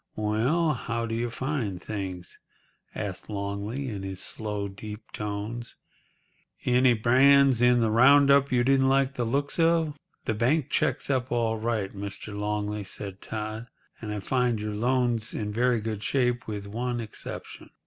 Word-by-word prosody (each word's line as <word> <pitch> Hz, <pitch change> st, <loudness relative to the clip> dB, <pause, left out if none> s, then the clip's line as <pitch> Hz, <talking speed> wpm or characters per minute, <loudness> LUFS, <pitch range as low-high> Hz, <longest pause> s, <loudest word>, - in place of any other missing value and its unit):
"Well, 125 Hz, +10 st, +1 dB
how 115 Hz, -2 st, -3 dB
do 115 Hz, -, -4 dB
you 120 Hz, +1 st, -1 dB
find 120 Hz, -7 st, -3 dB
things?" 95 Hz, -4 st, -6 dB, 0.6 s
asked 100 Hz, -4 st, -5 dB
Longley, 100 Hz, +6 st, -3 dB
in 105 Hz, -5 st, -4 dB
his 95 Hz, -1 st, -6 dB
slow, 105 Hz, 0 st, -3 dB
deep 105 Hz, +2 st, -9 dB
tones. 105 Hz, +3 st, -5 dB, 0.9 s
"Any 125 Hz, 0 st, +4 dB
brands 130 Hz, +2 st, +5 dB
in 125 Hz, 0 st, +5 dB
the 110 Hz, -1 st, +2 dB
round 140 Hz, +5 st, +6 dB
up 140 Hz, 0 st, +4 dB
you 125 Hz, -1 st, +3 dB
didn't 135 Hz, +1 st, +4 dB
like 135 Hz, 0 st, +2 dB
the 125 Hz, -3 st, -2 dB
looks 140 Hz, +7 st, -1 dB
of?" 165 Hz, -2 st, +3 dB, 0.3 s
"The 110 Hz, -, 0 dB
bank 125 Hz, +7 st, +1 dB
checks 135 Hz, +2 st, 0 dB
up 130 Hz, -2 st, 0 dB
all 115 Hz, -2 st, +1 dB
right, 110 Hz, -3 st, -2 dB
Mr. 100 Hz, +1 st, -6 dB
Longley," 105 Hz, 0 st, -2 dB
said 95 Hz, 0 st, -7 dB
Todd; 110 Hz, +1 st, -5 dB, 0.3 s
"and 110 Hz, -2 st, -5 dB
I 105 Hz, -1 st, -3 dB
find 125 Hz, 0 st, +1 dB
your 105 Hz, 0 st, -3 dB
loans 120 Hz, 0 st, 0 dB
in 105 Hz, -1 st, -3 dB
very 120 Hz, +1 st, +2 dB
good 110 Hz, -1 st, -4 dB
shape—with 120 Hz, -5 st, -1 dB
one 120 Hz, +4 st, -3 dB
exception. 110 Hz, -2 st, -7 dB
115 Hz, 155 wpm, -27 LUFS, 105-130 Hz, 0.9 s, round